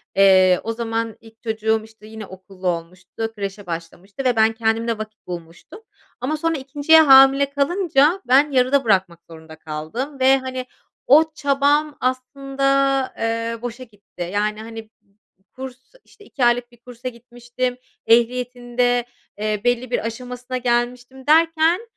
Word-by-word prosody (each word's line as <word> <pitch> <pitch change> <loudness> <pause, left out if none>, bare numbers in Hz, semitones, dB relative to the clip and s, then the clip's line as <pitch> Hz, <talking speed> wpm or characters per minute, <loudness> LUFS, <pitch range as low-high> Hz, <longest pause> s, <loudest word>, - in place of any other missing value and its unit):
Eee, 185 -2 +5
o 225 - -3
zaman 225 -1 -3
ilk 225 -1 -18
çocuğum, 220 -1 0
işte, 220 -1 -16
yeni 220 -1 -9
okullu 190 0 -9
olmuştu, 180 +6 -4
kreşe 200 -1 -6
başlamıştı 175 +7 -7
ve 250 -2 +2
ben 220 0 +3
kendimle 225 0 -1
vakit 215 0 -9
bulmuştum 170 - -9 0.4
ama 295 +5 -1
sonra 330 +1 -1
2'nciye 290 +4 +4
hamile 270 -1 +6
kalınca 300 +3 +1
ben 275 +4 +4
yarıda 265 +1 +3
bırakmak 190 -6 +1
zorunda 160 -1 -12
kaldım 160 - -6
ve, 265 +1 +5
hani, 260 -1 -5 0.4
o 315 +4 +5
çabam 290 0 +1
aslında, 275 +1 0
eee, 230 0 -2
boşa 245 +1 -6
gitti. 205 -6 -9
Yani, 210 +1 -1
hani, 225 0 -8
b - - -27 0.5
b 190 - -39
kurs, 260 - -10
işte, 415 - -19
2 255 - -1
aylık 240 0 +1
bir 240 - -20
kursa 245 +1 -8
gitmiştim, 245 +1 -5 0.3
ehliyetin 245 +1 +1
de, 245 -1 +2 0.3
eee, 210 0 -2
belli 245 0 0
bir 240 - -1
aşamasına 250 +2 -5
gelmiştim 245 +2 -2
derken, 325 +3 +3
240 Hz, 145 wpm, -21 LUFS, 220-270 Hz, 0.5 s, hamile